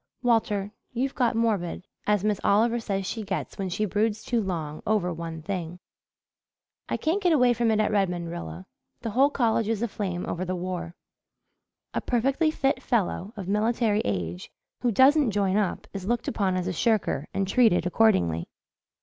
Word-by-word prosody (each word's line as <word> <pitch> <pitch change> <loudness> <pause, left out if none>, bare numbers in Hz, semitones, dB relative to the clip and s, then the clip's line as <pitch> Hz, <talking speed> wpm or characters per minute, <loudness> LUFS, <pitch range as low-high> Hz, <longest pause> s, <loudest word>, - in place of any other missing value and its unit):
"Walter, 210 -4 +1 0.2
you've 260 +3 -1
got 245 -4 +1
morbid 205 -6 0 0.2
as 210 -2 +2
Miss 210 -2 +1
Oliver 230 +4 +3
says 195 -4 -2
she 220 +4 -3
gets 195 -1 -4
when 190 -1 -2
she 190 +4 -1
broods 210 +2 0
too 235 -2 0
long 160 -6 -4
over 195 -5 +1
one 165 -1 -6
thing." 180 -2 -4 1.1
"I - - 0
can't 335 +6 0
get 355 -4 +3
away 250 -4 +5
from 235 0 +1
it 220 -1 +2
at 215 - +2
Redmond, 180 -5 0
Rilla. 175 +2 -7 0.4
The 230 - -3
whole 270 +6 +4
college 230 -5 +1
is 225 0 -1
aflame 195 -6 -3
over 175 - -3
the 185 0 -2
war. 175 -1 -4 1.0
A - - -1
perfectly 270 +6 +1
fit 275 -3 0
fellow, 210 -4 -1
of 190 -3 -6
military 215 +1 +1
age, 90 -3 -3 0.3
who 245 - +1
doesn't 270 +4 +5
join 200 -2 +1
up 205 0 0
is 195 -1 -5
looked 240 +1 0
upon 195 -4 0
as 180 0 -2
a 185 - -1
shirker 220 +4 +1
and 195 0 -1
treated 215 -5 +4
accordingly. 175 - +2
205 Hz, 175 wpm, -26 LUFS, 180-230 Hz, 1.1 s, away